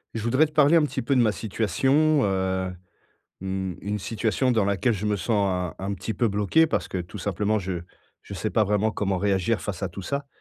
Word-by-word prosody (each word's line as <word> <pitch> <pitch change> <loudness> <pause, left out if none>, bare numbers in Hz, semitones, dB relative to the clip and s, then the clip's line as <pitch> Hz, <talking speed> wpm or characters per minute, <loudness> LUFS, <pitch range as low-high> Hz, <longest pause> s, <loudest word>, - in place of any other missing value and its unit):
Je 110 - -2
voudrais 130 +7 +3
te 155 - -9
parler 150 +1 +5
un 165 - +5
petit 150 - -2
peu 140 - 0
de 125 - +5
ma 110 -2 +3
situation, 130 - +1
heu, 95 -1 0 0.7
mmh, 95 -1 -3
une 105 +1 -3
situation 115 +5 0
dans 110 -4 +2
laquelle 100 +5 +1
je 105 0 -5
me 105 -1 +1
sens 95 -3 0
un - - -5
un 100 +1 -2
petit 95 +4 -5
peu 120 - +1
bloqué 105 +11 +3
parce - - -1
que, 95 - -4
tout 90 +4 -7
simplement, 105 +3 0
je 90 -2 -4 0.4
je 100 - -9
sais 105 +4 -2
pas 110 - +3
vraiment 105 +1 +1
comment 100 -3 -1
réagir 95 -2 +1
face - - -5
à - - 0
tout 100 - -8
ça 140 +7 -3
105 Hz, 225 wpm, -25 LUFS, 95-120 Hz, 0.7 s, parler